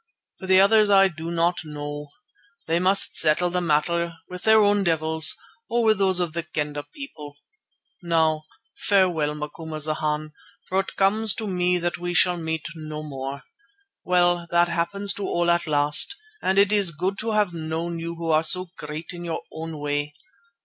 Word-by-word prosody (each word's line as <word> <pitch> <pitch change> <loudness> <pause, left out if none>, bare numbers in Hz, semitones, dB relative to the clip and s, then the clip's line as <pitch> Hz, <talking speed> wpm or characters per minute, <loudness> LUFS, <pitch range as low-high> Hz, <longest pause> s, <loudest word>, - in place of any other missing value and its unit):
For 190 - -8
the 190 0 +6
others 210 +1 +5
I 195 -1 +6
do 165 -1 -7
not 170 +1 0
know. 145 -1 -7 0.6
They 165 +1 +1
must 190 +2 +4
settle 165 +3 +3
the 180 0 -1
matter 170 +1 0
with 180 0 -8
their 220 +1 +5
own 205 -1 +3
devils, 160 -2 +2 0.3
or 235 0 +1
with 215 -2 +3
those 190 -2 +2
of 175 -3 -2
the 170 - -2
Kendah 150 -3 -4
people. 150 - -10 0.7
Now 160 -3 +1 0.3
farewell, 175 -7 +1
Macumazana, 155 0 -4 0.4
for 190 - 0
it 195 - -4
comes 205 +1 +2
to 225 - -4
me 180 -2 +1
that 175 0 -3
we 175 0 -4
shall 180 +1 +3
meet 160 -1 -4
no 155 -1 -7
more. 135 -1 -6 0.6
Well, 175 -1 +2
that 175 0 +3
happens 170 +4 -1
to 200 - -5
all 175 0 +1
at 170 0 0
last, 150 - +2 0.3
and 190 +1 0
it 200 0 +4
is 205 -4 +4
good 190 +5 -2
to 225 0 -2
have 210 -4 +1
known 165 +1 -4
you 170 +1 -5
who 165 -1 -3
are 155 0 +4
so 180 +2 +3
great 150 +2 -7
in 175 -1 -8
your 165 -1 -4
own 160 0 -7
way. 145 0 -3
170 Hz, 175 wpm, -24 LUFS, 155-190 Hz, 0.7 s, the